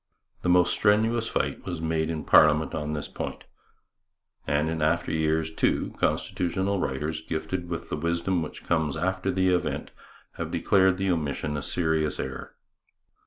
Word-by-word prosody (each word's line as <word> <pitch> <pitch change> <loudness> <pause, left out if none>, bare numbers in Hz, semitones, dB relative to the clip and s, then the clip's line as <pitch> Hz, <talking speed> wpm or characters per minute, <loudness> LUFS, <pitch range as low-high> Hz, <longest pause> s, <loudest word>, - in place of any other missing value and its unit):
The 90 - -1
most 90 0 +4
strenuous 110 +3 +2
fight - - -2
was 90 -3 -4
made 80 0 0
in 80 -2 -3
parliament 75 0 +5
on 75 -1 -3
this 75 -1 -3
point, - - -6 1.0
and 75 +2 +1
in 80 -1 -2
after 80 +2 +1
years, 80 0 0
too, - - 0
constitutional 95 +3 0
writers, 75 +2 -2
gifted 80 +3 -4
with 85 -2 -5
the - - -2
wisdom 85 +3 0
which 80 - -7
comes 80 -3 0
after 95 +3 -1
the 95 0 +2
event, 90 -1 -1 0.5
have - - -3
declared 95 -2 +3
the 95 0 +1
omission 75 -2 -2
a 75 - -2
serious 80 -2 0
error. 65 0 -6
80 Hz, 155 wpm, -26 LUFS, 75-90 Hz, 1.0 s, parliament